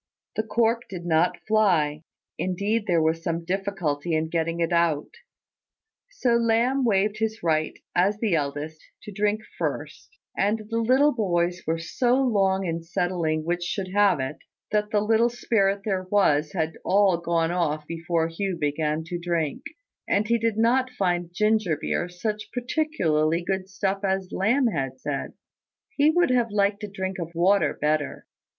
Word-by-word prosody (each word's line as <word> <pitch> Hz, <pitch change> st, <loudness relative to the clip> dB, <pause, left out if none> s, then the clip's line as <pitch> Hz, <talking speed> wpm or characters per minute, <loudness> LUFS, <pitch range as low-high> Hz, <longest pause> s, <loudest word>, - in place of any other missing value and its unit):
The -, -, +1 dB
cork 230 Hz, +1 st, 0 dB
did 175 Hz, -3 st, -7 dB
not 170 Hz, +1 st, +2 dB
fly; 175 Hz, -9 st, +2 dB, 0.4 s
indeed 205 Hz, +4 st, -1 dB
there 170 Hz, -3 st, +3 dB
was 160 Hz, +1 st, +1 dB
some 165 Hz, 0 st, -3 dB
difficulty 175 Hz, -5 st, -1 dB
in 160 Hz, 0 st, -1 dB
getting 165 Hz, 0 st, -1 dB
it 170 Hz, +1 st, 0 dB
out: 165 Hz, -3 st, +1 dB, 1.0 s
so 250 Hz, -, +1 dB
Lamb 235 Hz, +4 st, +2 dB
waived 210 Hz, -1 st, +1 dB
his 220 Hz, -2 st, -2 dB
right, 155 Hz, -2 st, 0 dB, 0.2 s
as 190 Hz, +4 st, +3 dB
the 215 Hz, -3 st, 0 dB
eldest, 150 Hz, +1 st, -2 dB, 0.2 s
to 210 Hz, -, -8 dB
drink 210 Hz, +2 st, 0 dB, 0.2 s
first; 445 Hz, -, -4 dB, 0.2 s
and 215 Hz, +2 st, 0 dB
the 230 Hz, -, +1 dB
little 260 Hz, +6 st, +4 dB
boys 180 Hz, -5 st, 0 dB
were 165 Hz, +1 st, +1 dB
so 240 Hz, +9 st, +1 dB
long 195 Hz, -7 st, +2 dB
in 165 Hz, -1 st, -2 dB
settling 165 Hz, -2 st, -1 dB
which 175 Hz, +1 st, -1 dB
should 190 Hz, +1 st, -3 dB
have 205 Hz, -6 st, +4 dB
it, 130 Hz, +3 st, -3 dB, 0.3 s
that 210 Hz, 0 st, +1 dB
the 210 Hz, -1 st, +1 dB
little 225 Hz, +2 st, +3 dB
spirit 200 Hz, -4 st, +1 dB
there 190 Hz, -3 st, -1 dB
was 155 Hz, -7 st, +2 dB
had 160 Hz, -3 st, -2 dB
all 195 Hz, -3 st, +3 dB
gone 170 Hz, -1 st, 0 dB
off 155 Hz, -4 st, -1 dB
before 165 Hz, 0 st, -1 dB
Hugh 180 Hz, +2 st, -3 dB
began 150 Hz, +1 st, -1 dB
to 175 Hz, +2 st, -5 dB
drink; 170 Hz, -4 st, -1 dB, 0.5 s
and 205 Hz, +2 st, +1 dB
he 235 Hz, 0 st, +3 dB
did 225 Hz, -1 st, 0 dB
not 250 Hz, +3 st, +3 dB
find 175 Hz, -7 st, -1 dB
ginger 210 Hz, -4 st, +1 dB
beer 175 Hz, -, -2 dB
such 210 Hz, +4 st, -4 dB
particularly 185 Hz, -, 0 dB
good 190 Hz, +1 st, -2 dB
stuff 195 Hz, +1 st, -2 dB
as 190 Hz, -1 st, -1 dB
Lamb 240 Hz, +8 st, +2 dB
had 135 Hz, -, -2 dB
said. 140 Hz, 0 st, -4 dB, 0.6 s
He 290 Hz, +1 st, +4 dB
would 345 Hz, -3 st, +3 dB
have 240 Hz, -2 st, +2 dB
liked 205 Hz, 0 st, +1 dB
a -, -, -2 dB
drink 190 Hz, -1 st, -4 dB
of 170 Hz, 0 st, -6 dB
water 190 Hz, +4 st, +3 dB
better. 150 Hz, -1 st, -1 dB
190 Hz, 160 wpm, -25 LUFS, 165-215 Hz, 1.0 s, little